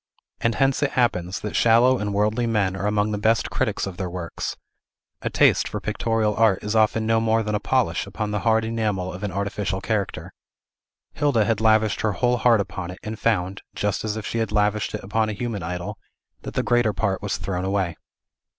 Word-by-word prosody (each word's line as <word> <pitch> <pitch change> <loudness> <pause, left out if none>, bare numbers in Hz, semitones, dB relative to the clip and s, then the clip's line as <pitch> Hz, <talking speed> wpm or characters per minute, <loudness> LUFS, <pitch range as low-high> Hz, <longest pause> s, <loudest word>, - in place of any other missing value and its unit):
And 115 -1 +1
hence 135 0 +2
it 145 - 0
happens, 95 -7 0
that 105 - -5
shallow 120 +3 +5
and 105 0 -2
worldly 105 +4 +1
men 100 -4 +1
are 100 +1 -2
among 105 0 +1
the 105 - -2
best 110 +1 +2
critics - - -1
of 95 -2 -7
their 95 -2 -3
works; 85 -1 -5 0.6
a - - -2
taste - - +4
for - - -4
pictorial 110 -2 0
art 110 -4 +3
is 105 +1 -2
often 110 0 +3
no 115 0 +3
more 115 0 +2
than 105 0 -2
a 105 - +1
polish 110 -7 0
upon 105 +1 -4
the 105 - -1
hard 110 +1 +2
enamel 105 -5 -1
of 90 - -8
an 105 -2 -3
artificial 100 0 -2
character. 105 0 -3 0.8
Hilda 140 -7 +2
had 110 -1 0
lavished 110 -1 +3
her 110 -2 +1
whole 125 +5 +1
heart 115 -3 +4
upon 95 -2 -5
it, 90 - -7
and 110 0 -5
found 100 -4 0
(just 105 -1 -1
as 110 -1 -2
if 110 - -5
she 115 - -2
had 110 -2 -1
lavished 105 0 +1
it - - -6
upon 110 +3 0
a - - -2
human 110 -1 -4
idol) 90 +1 -5 0.4
that - - -8
the - - +1
greater 120 -3 +2
part 100 -3 -1
was 100 -2 -2
thrown 90 -2 -3
away. 95 -3 -1
105 Hz, 210 wpm, -23 LUFS, 100-115 Hz, 0.8 s, shallow